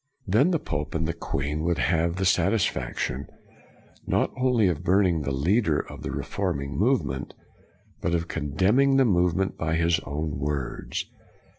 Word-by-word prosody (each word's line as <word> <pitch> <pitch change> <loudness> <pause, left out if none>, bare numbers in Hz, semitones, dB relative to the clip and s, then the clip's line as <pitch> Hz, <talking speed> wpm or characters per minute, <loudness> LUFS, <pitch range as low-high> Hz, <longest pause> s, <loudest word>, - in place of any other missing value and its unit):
Then 110 - +3
the 175 - +2
pope 75 - -4
and 80 0 0
the 85 - -1
queen 75 -2 -3
would 85 0 0
have 85 +2 +1
the 95 0 -1
satisfaction, 90 - 0 0.8
not - - +1
only 125 -5 +3
of 85 -2 -1
burning 90 -2 +3
the 70 - -2
leader 80 - +2
of - - -6
the - - -4
reforming 75 -8 -3
movement, 75 - 0 0.7
but 85 - 0
of 85 0 -1
condemning 95 - +2
the 135 - +5
movement 90 -2 +1
by 80 0 0
his 85 0 +2
own 75 0 -4
words. 70 -2 -3
85 Hz, 150 wpm, -26 LUFS, 75-95 Hz, 0.8 s, the